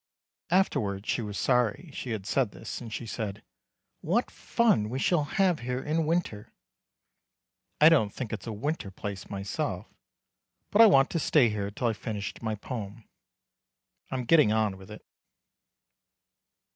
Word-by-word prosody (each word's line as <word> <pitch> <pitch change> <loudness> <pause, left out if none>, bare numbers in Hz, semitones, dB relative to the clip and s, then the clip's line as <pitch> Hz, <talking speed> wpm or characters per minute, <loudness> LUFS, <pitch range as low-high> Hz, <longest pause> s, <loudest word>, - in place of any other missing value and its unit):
Afterwards 105 - +1
she - - 0
was 105 -2 -5
sorry 125 - +1
she 130 - -6
had 110 -4 -3
said 125 +1 +1
this 115 - -7
and 115 -2 -8
she 115 - -5
said: 105 -2 -5 0.6
"What 220 +10 0
fun 215 - +1
we 125 - -3
shall 150 +2 +2
have 180 +2 +1
here 125 +1 -3
in 155 +3 -1
winter." 155 -11 -2 1.3
I 155 - +9
don't 140 -11 +4
think 115 -1 -5
it's 110 +1 -6
a - - -3
winter 115 +1 -3
place 100 0 -7
myself, 100 -1 -3 0.9
but 210 - +6
I 225 - +10
want 135 -8 +5
to 165 - 0
stay 145 -5 +4
here 100 -2 -3
till 105 +4 -4
I've 115 -2 +1
finished 105 -3 -5
my 110 -2 -2
poem. 110 0 -7 1.1
I'm 130 -1 -2
getting 150 -4 +5
on 110 -3 +1
with 95 +1 -14
it. 105 - -11
115 Hz, 155 wpm, -28 LUFS, 105-150 Hz, 1.3 s, I